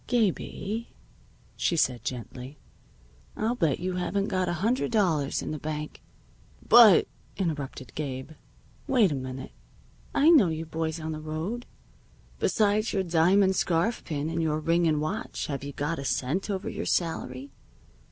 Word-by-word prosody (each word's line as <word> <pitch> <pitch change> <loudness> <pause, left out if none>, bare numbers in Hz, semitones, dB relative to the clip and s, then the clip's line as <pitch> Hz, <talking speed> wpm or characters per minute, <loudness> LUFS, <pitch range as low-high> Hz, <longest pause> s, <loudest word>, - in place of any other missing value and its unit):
"Gabie," 225 0 -1 0.6
she 175 - 0
said 125 -6 +1
gently, 125 +3 -6 0.8
"I'll 220 +2 0
bet 165 - +1
you 180 +1 -2
haven't 195 +2 -1
got 185 -1 0
a - - 0
hundred 250 +3 +1
dollars 170 -11 +1
in - - -4
the 155 - -4
bank 150 0 -5 0.3
" - - -31 0.3
"But 225 -7 +8
" - - -31
interrupted 145 - -4
Gabe. 135 -1 -5 0.6
"Wait 230 -9 +4
a - - -1
minute. 130 0 -6 0.6
I 305 +4 +6
know 275 - +7
you 160 0 -3
boys 160 0 -3
on 160 0 -4
the 155 0 -5
road. 160 +10 -4 0.7
Besides 215 +1 +2
your 195 -2 +1
diamond 185 +3 +3
scarf 175 +6 +1
pin 150 -2 -3
and 165 0 -1
your 155 -1 0
ring 165 +2 +2
and 155 -2 +2
watch, 190 +10 -3
have 140 -2 -4
you 140 - -5
got 150 +4 -2
a - - -4
cent 135 +9 -1
over 195 -1 -2
your - - -4
salary? 140 -6 -2
165 Hz, 160 wpm, -27 LUFS, 150-195 Hz, 0.8 s, But